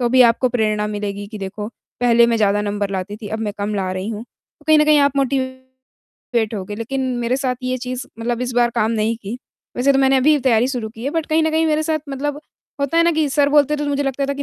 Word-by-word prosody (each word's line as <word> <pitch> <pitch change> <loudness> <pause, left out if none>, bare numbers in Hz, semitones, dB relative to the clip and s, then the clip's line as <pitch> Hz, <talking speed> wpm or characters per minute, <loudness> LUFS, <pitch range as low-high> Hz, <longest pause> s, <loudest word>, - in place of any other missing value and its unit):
तो 240 - +2
भी 255 +1 +6
आपको 240 +2 +3
प्रेरणा 215 -3 0
मिलेगी 205 -1 -4
कि, 215 0 -9
देखो, 205 +2 -5 0.3
पहले 235 -1 +5
मैं 235 - +1
ज़्यादा 205 -1 +2
नंबर 205 -1 -2
लाती 195 +2 -4
थी, 215 -2 -8
अब 220 - -3
मैं 210 -2 -2
कम 205 +1 -2
ला 190 -2 -1
रही 185 +3 -4
हूँ। 220 0 -4
तो 300 +4 -31
कहीं 310 -1 +6
न 300 - +5
कहीं 305 -1 +5
आप 280 -1 +2
मोटिवेट 260 -4 -3
होगे," 200 +1 -5
लेकिन 250 +4 -3 0.2
मेरे 240 +2 0
साथ 260 -2 -1
ये 255 0 -1
चीज़, 250 +1 -5
मतलब 235 +1 -2
इस 250 - -3
बार 240 -1 +4
काम 220 +1 +1
नहीं 225 0 0
की, 215 +5 -5 0.4
वैसे 270 +3 +3
तो 270 - +2
मैंने 270 0 +4
अभी 280 +4 +4
ही 295 - +3
तैयारी 245 -1 +3
शुरू 240 -5 -3
की 225 +2 -10
है 280 - 0
बट 325 -1 -2
कहीं 315 0 +2
न 315 - +1
कहीं 320 +1 +2
मेरे 310 0 +1
साथ 310 0 0
मतलब 290 +2 -3 0.4
होता 280 +4 0
है 335 - +6
ना 340 - +4
कि 310 -1 +1
सर 280 +1 +2
बोलते 295 0 +4
थे, - - -7
तो - - -3
मुझे 285 0 0
लगता 275 0 -1
था 280 - -2
कि 285 - -4
250 Hz, 270 wpm, -20 LUFS, 215-280 Hz, 0.4 s, भी